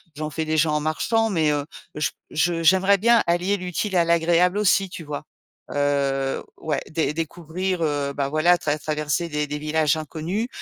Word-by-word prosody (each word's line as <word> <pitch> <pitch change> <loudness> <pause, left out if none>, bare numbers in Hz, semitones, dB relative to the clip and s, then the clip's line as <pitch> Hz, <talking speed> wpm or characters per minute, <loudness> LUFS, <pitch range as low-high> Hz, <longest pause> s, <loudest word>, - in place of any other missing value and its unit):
j'en 155 +1 -4
fais 160 +1 -3
déjà 155 0 +2
en 150 - +1
marchant. 220 +9 0
Mais, 160 -5 +2
heu, 145 -1 -1 0.3
j 150 -1 0 0.2
je 165 +1 0
j'aimerais 190 +4 +4
bien 235 +2 +4
allier 175 +4 +1
l'utile 185 +2 -3
à 175 - +5
l'agréable 170 +3 +3
aussi, 195 -2 +3
tu 165 - -7
vois? 145 -1 -5 0.5
Heu, 140 -1 0
ouais. 150 -3 -2
Dé 155 -1 -1
découvrir, 170 +3 -3
heu, 145 -2 -1
bah, 140 -1 -2
voilà, 170 +4 +3
trav 150 0 -1
traverser 150 +2 -1
des 150 -1 -2
des 150 +1 -4
villages 155 0 +1
inconnus 165 +8 -3
160 Hz, 175 wpm, -23 LUFS, 150-180 Hz, 0.5 s, à